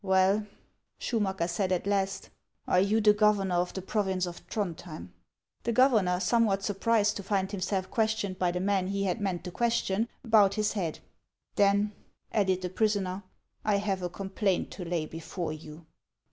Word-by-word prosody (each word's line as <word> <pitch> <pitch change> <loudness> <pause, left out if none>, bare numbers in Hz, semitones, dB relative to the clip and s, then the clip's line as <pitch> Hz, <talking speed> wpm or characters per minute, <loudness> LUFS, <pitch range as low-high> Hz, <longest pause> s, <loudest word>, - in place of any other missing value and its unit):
" - - -39
Well," 195 +3 +3 0.5
Schumacker 190 -7 -1
said 185 +2 -1
at 180 0 0
last, 195 -1 -1 0.2
" - - -45
are 180 - +4
you 205 +4 +3
the 210 0 +6
governor 205 -4 +2
of 180 +1 -1
the 190 - -4
province 190 -3 0
of 175 -1 -6
Throndhjem? 170 - -4 0.3
" 85 - -48
The 235 - 0
governor, 220 -8 +4
somewhat 195 0 +2
surprised 210 +1 +1
to - - -5
find 195 -1 0
himself 190 -1 -2
ques 220 -3 +2
tioned 195 -3 -4
by 180 - +2
the 180 +1 -2
man 190 -1 +1
he 200 +1 -1
had 195 +3 -1
meant 185 -4 -2
to 180 - -6
question, 230 0 0 0.2
bowed 210 -3 +5
his 210 -1 0
head. 175 -7 -3 0.3
" - - -52
Then," 205 +1 +3 0.4
added 190 -3 +1
the 180 - -2
prisoner, 200 -2 0 0.2
" - - -46
I 210 -1 +2
have 200 -2 -1
a 180 - -2
complaint 195 +1 -1
to 185 - -6
lay 165 -2 -1
before 165 +1 -5
you." 155 +1 -11
195 Hz, 190 wpm, -29 LUFS, 180-210 Hz, 0.5 s, the